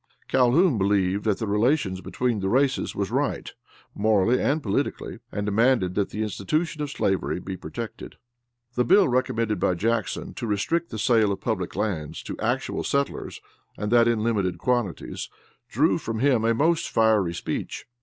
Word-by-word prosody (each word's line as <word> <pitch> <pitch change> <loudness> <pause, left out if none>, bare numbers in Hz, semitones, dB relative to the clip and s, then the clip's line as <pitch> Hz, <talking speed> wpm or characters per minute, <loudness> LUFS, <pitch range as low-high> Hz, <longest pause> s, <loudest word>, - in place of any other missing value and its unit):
Calhoun, 130 - +3
believed 100 0 +1
that 105 -3 +2
the 110 - -3
relations 105 -2 +1
between 120 +3 -1
the 95 0 -1
races 135 +4 +1
was - - -2
right, - - -1 0.4
morally 110 +3 +2
and 150 +2 +1
politically, 100 - -2
and 105 - -3
demanded 110 -2 +2
that 100 0 0
the 110 - -3
institution 150 - -2
of 145 - -2
slavery 95 -9 -1
be 95 +1 -6
protected. 115 +4 -7 0.6
The 125 - +2
bill 195 +7 +5
recommended 115 -5 0
by 90 - +1
Jackson, 110 +3 -1
to 115 - -5
restrict 160 - 0
the 110 - -6
sale 110 -3 +3
of 100 - -3
public 95 -7 -3
lands 95 -8 -3
to - - -6
actual - - -1
settlers 140 0 -2 0.4
and 105 +1 -3
that 120 -1 +5
in 115 -2 +1
limited 100 -6 0
quantities, 120 -8 -2 0.4
drew - - +2
from 115 0 -4
him 125 -2 +2
a 115 0 +3
most 165 +6 +1
fiery 110 -6 +2
speech. - - -4
110 Hz, 165 wpm, -25 LUFS, 100-125 Hz, 0.6 s, bill